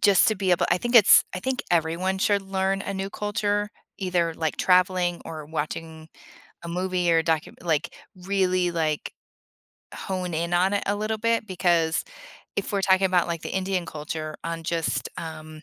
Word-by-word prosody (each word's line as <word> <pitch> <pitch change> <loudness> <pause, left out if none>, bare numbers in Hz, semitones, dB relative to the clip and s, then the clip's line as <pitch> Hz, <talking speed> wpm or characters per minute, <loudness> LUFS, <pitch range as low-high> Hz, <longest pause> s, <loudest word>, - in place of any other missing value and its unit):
just 200 -3 +5
to 220 - +1
be 190 -2 -1
able 175 - +3
I 175 - +4
think 240 +5 -3
it's 225 -5 +8
I 180 - -4
think 260 +3 -2
everyone 175 +3 +1
should 200 0 +2
learn 195 0 -1
a 200 - -4
new 195 0 -3
culture, 205 0 -1 0.3
either, 175 -3 0
like, 160 -1 -2
traveling 180 -1 +2
or 155 -2 -7
watching 160 +1 -5 0.5
a 170 - -7
movie 180 0 0
or 165 - +5
a - - -4
docum 160 -1 0
like 165 -1 -1 0.2
really, 185 -1 0
like, 160 -3 -2 0.8
hone 185 -2 -4
in 170 +2 -1
on 185 +3 +3
it 205 - 0
a 200 - +1
little 215 +1 -2
bit, 230 0 +1
because, 170 -3 +1 0.5
if - - -2
we're 200 -1 0
talking 190 0 +4
about, 180 -2 +2
like, 170 -1 -2
the - - -5
Indian 190 -2 -1
culture 155 0 -5
on 165 0 -4
just, 165 0 -1
um, 155 -1 -8
180 Hz, 180 wpm, -25 LUFS, 165-195 Hz, 0.8 s, it's